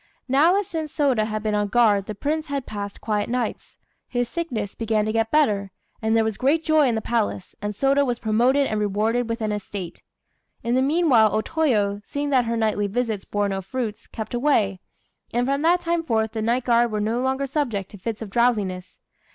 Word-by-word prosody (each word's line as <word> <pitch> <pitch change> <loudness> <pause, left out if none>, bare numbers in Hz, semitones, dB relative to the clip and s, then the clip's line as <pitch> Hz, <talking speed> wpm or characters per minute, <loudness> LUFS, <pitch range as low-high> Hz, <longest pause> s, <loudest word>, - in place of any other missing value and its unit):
Now 295 +8 +4
as 405 - 0
since 320 -5 -4
Sôda 260 -8 +1
had 215 -1 -3
been 215 -1 0
on 205 0 +1
guard 205 -3 +3
the 215 - -5
Prince 305 +8 -2
had 280 -2 -3
passed 205 -1 -6
quiet 210 -1 -1
nights, 245 -2 -3 0.3
his 245 -1 -1
sickness 240 - -3
began 220 -2 0
to 215 - 0
get 225 0 +1
better, 210 -10 +2 0.3
and 220 0 +2
there 225 - +4
was 220 -2 -2
great 295 +5 +2
joy 310 -3 +4
in 235 - +1
the 220 - -1
palace, 225 -5 -2
and 205 0 -3
Sôda 275 +4 +3
was 245 -3 -1
promoted 245 +6 +2
and 215 -4 -1
rewarded 215 +4 0
with 230 +1 -3
an 215 -1 -1
estate. 200 -3 -6 0.6
In 235 +1 0
the 260 - +3
meanwhile 275 -6 +4
O 215 - +1
Toyo, 215 -10 0
seeing 285 +4 -3
that 255 -3 +3
her 230 0 -1
nightly 215 -2 +1
visits 220 -1 -2
bore 205 0 0
no 195 -1 -2
fruits, 220 +1 -5
kept 220 +1 -7
away; 240 -7 +1 0.6
and 245 +1 +2
from 275 +2 0
that 345 +3 +3
time 340 0 0
forth 220 -8 0
the 220 -1 -3
night 235 +3 +1
guard 235 -1 +3
were 210 - -1
no 220 +3 0
longer 265 +1 0
subject 250 -9 -2
to 205 - -11
fits 225 +3 -4
of 205 - -9
drowsiness. 205 -6 0
230 Hz, 210 wpm, -23 LUFS, 210-270 Hz, 0.6 s, Now